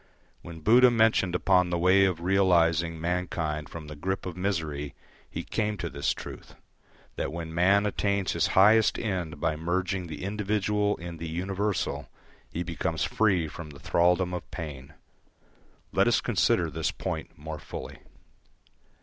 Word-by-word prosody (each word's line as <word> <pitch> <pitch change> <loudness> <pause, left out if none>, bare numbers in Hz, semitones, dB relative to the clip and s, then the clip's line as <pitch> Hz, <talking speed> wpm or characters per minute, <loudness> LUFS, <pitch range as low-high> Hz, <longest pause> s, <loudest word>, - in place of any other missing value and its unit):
When 85 -1 -10
Buddha 125 +8 +6
mentioned 110 -6 +3
upon 90 -1 +3
the 85 - 0
way 95 +3 +5
of 90 -3 -1
realising 85 -3 +2
mankind 85 -3 -2
from 80 -2 -8
the 75 0 -8
grip 95 +6 -3
of 90 -3 -5
misery 80 -7 -2 0.3
he - - -5
came 105 -1 -2
to 85 -2 -4
this 70 0 0
truth: - - -8 0.6
that - - -2
when 80 0 -6
man 95 +4 +4
attains 100 -1 0
his 85 +1 +1
highest 110 +3 +6
end 90 -8 -3
by 80 -1 0
merging 90 +3 -2
the 80 +1 -7
individual 105 +1 0
in 85 0 -7
the 80 0 -5
universal, 95 +2 -2 0.4
he 85 - -3
becomes 85 -3 -2
free 95 -7 +2
from 75 +1 -8
the 70 -1 -12
thraldom 90 +1 +2
of 90 - -5
pain. 75 -3 -7 1.0
Let - - +3
us - - +4
consider 85 -2 +1
this 80 +2 -1
point - - -5
more 75 +1 -7
fully. - - -8
90 Hz, 150 wpm, -27 LUFS, 80-95 Hz, 1.0 s, Buddha